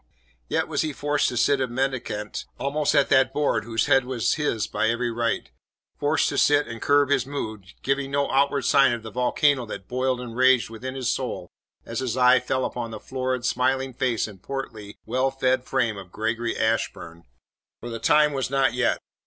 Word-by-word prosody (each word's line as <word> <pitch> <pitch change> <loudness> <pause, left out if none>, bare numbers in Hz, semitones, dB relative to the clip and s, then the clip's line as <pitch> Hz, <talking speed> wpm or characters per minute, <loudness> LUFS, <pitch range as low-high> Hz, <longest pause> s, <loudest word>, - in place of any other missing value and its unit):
Yet - - 0
was - - -1
he 155 -2 -2
forced 145 +1 0
to 120 - -4
sit 140 +3 +3
a 130 - +1
mendicant 120 -4 -3
almost 145 +2 0
at 140 -1 +4
that 135 -1 +4
board 140 -7 +1
whose 115 -1 0
head 135 -2 +4
was 125 -3 0
his 115 -8 -1
by 110 - 0
every 120 +1 -1
right; 115 0 -2 0.5
forced - - +2
to - - -1
sit 145 0 +4
and 115 0 -8
curb 145 -1 +3
his 135 -2 +2
mood, 110 -9 -6
giving 135 0 0
no 140 0 0
outward 140 +1 +2
sign 135 -3 +4
of 115 -1 -5
the 110 - -8
volcano 130 +2 +2
that 95 -3 -7
boiled 130 0 -1
and 120 -2 -7
raged 130 -2 +4
within 130 +4 -6
his 130 -3 -3
soul - - -4 0.3
as 115 - -4
his 130 -2 -2
eye 125 0 +6
fell 130 +1 -1
upon 120 -2 -4
the 110 -1 -7
florid, 130 0 -3
smiling 130 +1 0
face 120 -3 0
and 100 -4 -13
portly, 110 -6 -6
well 130 +4 +1
fed 130 -1 0
frame 115 -4 0
of 95 -2 -10
Gregory 115 +3 -2
Ashburn. 95 -6 -2 0.5
For 120 - -7
the 115 - -5
time 150 +5 +4
was 135 -2 -2
not 135 -2 +2
yet. 125 0 +1
130 Hz, 195 wpm, -24 LUFS, 115-135 Hz, 0.5 s, eye